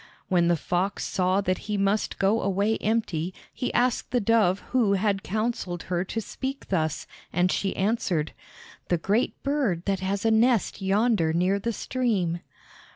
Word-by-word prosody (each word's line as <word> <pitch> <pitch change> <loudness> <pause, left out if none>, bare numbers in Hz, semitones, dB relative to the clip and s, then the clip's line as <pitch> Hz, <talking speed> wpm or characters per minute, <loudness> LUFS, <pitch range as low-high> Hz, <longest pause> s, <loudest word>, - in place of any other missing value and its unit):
When 175 -3 +3
the 175 - +4
fox 180 +5 -1
saw 185 +1 +1
that 185 -2 0
he 210 - 0
must 200 +2 0
go 205 +4 +2
away 200 +3 +1
empty 185 -6 -1 0.2
he 250 - -2
asked 245 0 +1
the 245 - +1
dove 205 -4 +3
who 235 -6 +3
had 200 0 +1
counseled 210 -4 -2
her 175 0 +1
to 225 - -3
speak 265 +5 -5
thus, 160 -5 0 0.3
and 180 +2 +2
she 195 - -1
answered: 190 -7 0 0.6
"The 175 - +2
great 205 +8 0
bird 265 - 0
that 195 -1 0
has 195 +2 -2
a 225 - +4
nest 225 -2 +2
yonder 195 -4 +2
near 185 +4 +2
the 235 +4 -1
stream." 210 -9 -1
200 Hz, 160 wpm, -26 LUFS, 180-225 Hz, 0.6 s, the